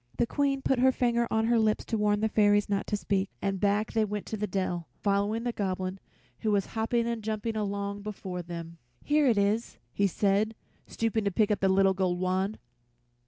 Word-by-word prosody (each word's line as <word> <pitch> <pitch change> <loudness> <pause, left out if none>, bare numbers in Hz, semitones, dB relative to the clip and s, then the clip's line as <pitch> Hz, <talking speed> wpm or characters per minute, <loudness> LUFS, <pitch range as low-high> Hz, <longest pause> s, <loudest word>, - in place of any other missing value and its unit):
The 240 - +3
Queen 275 +1 0
put 265 - +2
her 260 +1 +5
finger 235 -2 +1
on 220 0 +1
her 235 0 +3
lips 215 -1 +1
to 230 - -2
warn 210 0 +2
the 220 - +3
fairies 205 -1 +3
not 200 -1 -1
to 210 - 0
speak, 195 -1 -1
and 195 -1 -1
back 205 +2 +1
they 220 - +3
went 210 -1 -3
to - - -4
the 210 0 -2
dell, 180 -3 -2
following 205 +3 0
the 245 - -1
Goblin, 190 -3 -3 0.4
who 220 - -1
was 200 -2 +2
hopping 230 +1 0
and 235 -1 -2
jumping 220 +1 -2
along 200 -1 -2
before 195 -3 -5
them. 170 -1 -8 0.2
"Here 295 -1 +3
it 230 -4 +3
is," 205 +3 0 0.2
he 200 - +2
said, 205 +3 +1 0.3
stooping 225 -1 -1
to 200 - +1
pick 210 +3 +2
up 210 - 0
a - - +5
little 190 0 +4
gold 185 -2 0
wand. 185 +3 0
205 Hz, 210 wpm, -28 LUFS, 195-225 Hz, 0.4 s, her